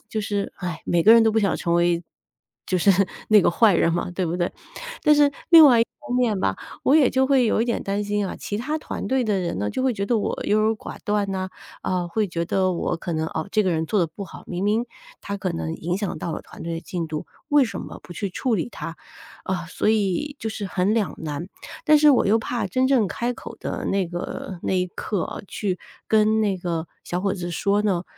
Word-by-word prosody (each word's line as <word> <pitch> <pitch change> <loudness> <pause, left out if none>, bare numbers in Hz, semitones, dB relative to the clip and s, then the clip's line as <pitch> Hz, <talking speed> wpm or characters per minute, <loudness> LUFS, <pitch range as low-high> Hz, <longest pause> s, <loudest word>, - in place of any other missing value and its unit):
就 215 - -1
是， 205 -1 -2
哎， 175 -3 -5
每 170 -1 +2
个 220 - +8
人 230 - +7
都 220 -1 +3
不 225 - +2
想 195 - +1
成 170 0 -1
为 170 0 +2 0.6
就 185 - +1
是 200 - +4 0.4
那 215 -2 +7
个 - - +3
坏 205 +1 +4
人 165 0 +3
嘛， 175 +1 -2
对 180 0 -2
不 170 +2 -2
对？ 175 -1 -1 0.5
但 300 - +6
是 290 -1 +4 0.2
另 325 -3 +10
外 240 -4 +6
一 - - +4 0.2
方 245 - 0
面 230 -5 +2
吧， 95 0 0 0.3
我 275 - +4
也 280 -5 +5
就 265 0 +2
会 265 -3 +4
有 220 - +2
一 - - +1
点 235 - -1
担 200 +1 -2
心 205 -1 -1
啊， - - -6
其 205 - -4
他 300 +6 -2
团 - - -5
队 260 -1 +1
的 210 -3 +1
人 170 - -2
呢， 105 +1 -1
就 260 - -2
会 260 -2 +2
觉 200 -2 -3
得 235 -1 +2
我 - - -2
优 215 +1 +3
柔 220 +1 +2
寡 - - -9
断 205 -1 0
呐， 185 0 -2 0.3
呃， 180 -1 -1
会 210 +2 0
觉 170 0 -2
得 185 +2 +1
我 170 - -1
可 170 +1 -5
能， 160 0 -1
哦， 160 +5 -4
这 215 - +3
个 185 - +2
人 160 0 -1
做 210 - +1
得 170 - +2
不 180 +5 -8
好， - - -12
明 180 +1 -4
明 220 +4 +1 0.3
他 200 0 -4
可 195 - -2
能 80 -1 -3
影 175 +3 -2
响 205 -3 -3
到 170 - -4
了 - - -5
团 - - -12
队 165 0 -3
的 165 - -4
进 175 -3 -4
度， 155 -1 -4 0.2
为 290 -3 +5
什 225 - -5
么 - - -8
不 175 - -9
去 195 +2 -4
处 245 +4 0
理 190 - -1
他？ 165 +2 -7 0.5
啊， 180 -3 -2
所 - - -1
以 220 +7 0
就 220 - -3
是 215 -1 -5
很 190 +3 +1
两 220 -4 0
难。 155 +3 -5 0.4
但 305 0 +6
是 300 0 +7
我 255 - +4
又 220 +3 +4
怕 230 -1 -2
真 255 +7 +2
正 245 -8 +3
开 240 +1 -2
口 - - -10
的 - - -4
那 195 -2 +1
个 175 +1 -6
那 - - 0
一 180 0 +1
刻 195 +1 -3
啊， - - -6
去 190 -4 -2 0.3
跟 220 0 +4
那 200 -3 +1
个 170 -2 -3 0.2
小 180 +1 -2
伙 195 -1 0
子 175 -2 -5
说 200 +4 +1
呢， 185 -4 0
200 Hz, 270 characters per minute, -23 LUFS, 175-225 Hz, 0.6 s, 另